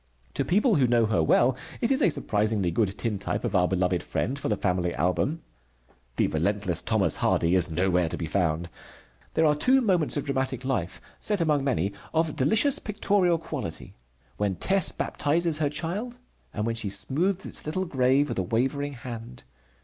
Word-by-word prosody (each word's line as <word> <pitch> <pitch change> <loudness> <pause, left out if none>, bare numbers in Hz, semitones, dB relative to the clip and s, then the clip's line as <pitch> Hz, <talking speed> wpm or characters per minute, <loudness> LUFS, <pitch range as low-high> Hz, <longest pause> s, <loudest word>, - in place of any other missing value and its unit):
To 140 - 0
people 205 - +2
who 130 -3 +3
know 120 -1 +3
her 105 -6 +1
well 120 +10 +3 0.2
it 235 - 0
is 270 +2 +2
a - - +5
surprisingly 105 - 0
good 100 +2 0
tintype 105 -2 -2
of 115 -4 -2
our 90 -1 +4
beloved 90 -2 0
friend, 135 +3 -3
for - - -3
the 105 - 0
family 90 -2 -1
album. 90 - 0 0.7
The - - +2
relentless 95 +2 0
Thomas - - +1
Hardy 85 +2 +1
is 90 -4 +4
nowhere 90 0 +1
to - - -3
be 85 - -3
found. 85 -1 -1 0.7
There 160 - +3
are 150 - +4
two 255 - +3
moments 180 - +1
of 145 - -2
dramatic 130 -2 -2
life 100 -10 -2 0.2
set 210 -2 +1
among 150 -4 +1
many 100 - 0 0.2
of 160 -1 +1
delicious 220 - +2
pictorial 200 -4 +1
quality: 145 - -6 0.4
when 100 -2 -1
Tess 190 - +2
baptizes 160 +1 0
her 150 -2 +1
child, 195 - -4 0.3
and 105 - -3
when 115 - 0
she 115 -3 -3
smooths 175 - 0
its - - -7
little 185 +5 -1
grave 135 -1 +2
with - - -2
a - - +2
wavering 135 +9 -1
hand. 115 - -9
130 Hz, 180 wpm, -26 LUFS, -, 0.7 s, a